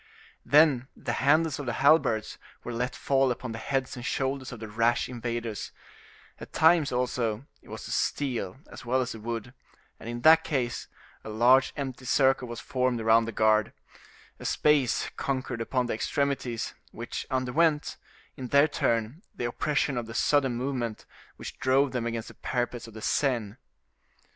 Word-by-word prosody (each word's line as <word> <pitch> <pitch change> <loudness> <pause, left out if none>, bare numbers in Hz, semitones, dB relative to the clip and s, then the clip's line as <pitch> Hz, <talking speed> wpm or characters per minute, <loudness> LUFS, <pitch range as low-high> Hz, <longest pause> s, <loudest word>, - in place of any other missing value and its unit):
Then 145 -4 +4
the - - -3
handles 155 +2 +3
of 140 - -5
the 120 - -1
halberds 140 -8 +3 0.2
were 120 - -5
let 125 +2 -2
fall 135 -1 +2
upon 125 0 -3
the 115 - -6
heads 135 +1 -2
and 125 - -8
shoulders 135 +1 -2
of 125 - -8
the 110 - -7
rash 115 +3 +1
invaders; 120 -3 -4 0.7
at - - -10
times, 160 -2 +4
also, 125 -2 -1 0.2
it - - -19
was - - -7
the - - -7
steel 125 -9 -1
as - - -10
well 130 +2 +1
as 125 0 -3
the 110 - -7
wood, 115 +2 -5 0.5
and, 115 - -8
in 120 0 -5
that 160 +4 +7
case, 125 -6 -2 0.4
a - - -8
large 125 +5 +4
empty 135 -2 -5
circle 130 0 +3
was 120 -1 -6
formed 125 -2 -1
around 115 +1 +4
the 115 - -4
guard; 110 0 +2 0.7
a - - -9
space 145 -5 +2
conquered 130 -3 -2
upon 125 +2 0
the 120 - -2
extremities, 125 -1 -2 0.2
which 115 +1 -6
underwent, 145 +4 +1 0.4
in 130 - -6
their 140 +4 +5
turn 115 +1 -1
the 120 - -3
oppression 140 +2 0
of 120 -2 -3
the 115 - -8
sudden 135 -3 +2
movement, 120 -3 -3 0.3
which - - -9
drove 135 +1 +3
them 120 -2 -2
against 115 -1 -4
the - - -12
parapets 120 -1 -3
of 115 - -13
the 110 - -8
Seine. 120 -7 0
125 Hz, 170 wpm, -28 LUFS, 115-135 Hz, 0.7 s, that